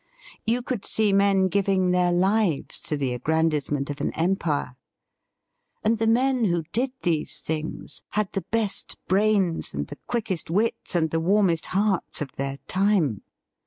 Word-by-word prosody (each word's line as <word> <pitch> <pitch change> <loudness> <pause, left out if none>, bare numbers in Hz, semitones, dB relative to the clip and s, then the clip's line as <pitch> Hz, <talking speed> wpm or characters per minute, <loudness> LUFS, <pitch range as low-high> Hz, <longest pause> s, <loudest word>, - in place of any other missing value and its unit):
You 240 +2 +1
could 240 -5 -3
see 215 -2 +2
men 195 -1 +4
giving 190 -1 +2
their 180 -1 +3
lives 190 -2 +1
to 150 - 0
the 135 -3 -1
aggrandisement 150 +1 0
of 145 - -6
an - - 0
empire. 165 -7 0 1.1
And 220 +1 +2
the 225 - +1
men 250 +1 +3
who 170 -4 +1
did 250 +4 0
these 165 -4 0
things 155 0 -5 0.2
had 210 -3 +1
the 195 - -2
best 215 -3 -1
brains 195 - +1
and 70 +1 -2
the - - -10
quickest 215 -10 -2
wits 205 +2 0
and 160 -2 +2
the 165 - +1
warmest 175 -1 +2
hearts 195 -1 0
of 145 -3 -4
their 135 0 -4
time. 185 - +2
185 Hz, 155 wpm, -25 LUFS, 160-210 Hz, 1.1 s, men